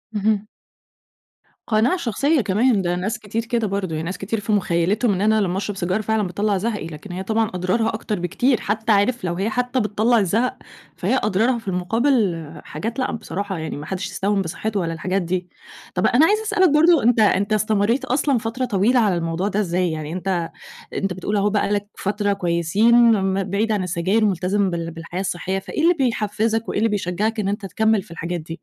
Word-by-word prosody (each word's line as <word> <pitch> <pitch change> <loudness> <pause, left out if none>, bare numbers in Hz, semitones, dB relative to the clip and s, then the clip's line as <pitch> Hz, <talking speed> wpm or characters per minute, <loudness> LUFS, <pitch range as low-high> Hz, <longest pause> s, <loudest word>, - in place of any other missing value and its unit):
اهم. 210 0 +1 1.2
قناعة 235 +10 +2
شخصية 275 +2 +1
كمان، 210 +2 +2
ده 175 0 0
ناس 210 +7 -2
كتير 220 +2 -4
كده 230 -2 0
برضو، 190 -4 -2
يعني 155 +1 -3
ناس 185 - -4
كتير 210 +3 -3
في 210 +1 -3
مُخيّلتهم 200 +3 +1
إن 185 - -2
أنا 215 0 +3
لمّا 185 -1 -1
أشرب 205 0 -3
سيجارة 185 +4 0
فعلًا 220 0 0
بتطلَّع 200 +2 0
زهقي، 210 -4 -2
لكن 165 +4 -9
هي 185 +2 -4
طبعًا 220 +1 0
أضرارها 185 +6 0
أكتر 215 -3 -3
بكتير، 230 +8 +1
حتّى 220 +2 -1
عارف 210 +3 +2
لو 175 -1 -1
هي 195 +5 -1
حتّى 250 +2 -1
بتطلَّع 220 +2 +2
الزهق، 220 +6 0 0.4
فهي - - 0
أضرارها 220 +5 +2
في 225 - -17
المقابل 190 - +1 0.2
حاجات 225 - -5
لأ 255 - 0
بصراحة، 200 -4 -4
يعني 160 -2 -5
ما 150 - -7
حدّش 190 +2 -4
يستهون 200 0 0
بصحّته 200 +4 -3
ولا 165 -2 -2
الحاجات 185 +4 -1
دي، 180 +1 -2 0.5
طَب - - +1
أنا 265 +7 +5
عايزة 425 +4 +2
أسألك 405 -5 +3
برضو 320 +2 +5
أنت 235 0 +3
أنت 205 0 +3
استمريت 215 +3 +1
أصلًا 275 0 +1
فترة 230 +3 -2
طويلة 235 +3 +2
على 205 -5 +2
الموضوع 165 +3 -1
ده 210 0 -1
إزاي، 180 -3 0
يعني 155 0 -5
أنت 180 -2 -2 0.4
أنت 195 -2 -1
بتقول 185 +4 -3
أهو 200 +1 +2
بقى 205 0 0
لك 205 0 -1
فترة 205 0 0
كويسين 185 +5 +2 0.3
م 190 0 0
بعيد 205 +4 -1
عن 205 -3 0
السجاير 185 +5 +1
ملتزم 195 +1 +1
بال 170 -1 -3
بالحياة 170 +3 -6
الصحية، 190 +1 -2
فإيه 305 - -4
اللي 345 +2 +6
بيحفِّزك 225 - 0
وإيه - - -2
اللي 225 - +2
بيشجّعك 210 +3 -1
إن 200 - -1
أنت 205 0 -2
تكمّل 220 +2 +1
في 205 - -17
الحاجات 170 +1 -4
دي؟ 165 +2 -8
205 Hz, 195 wpm, -21 LUFS, 185-225 Hz, 1.2 s, اللي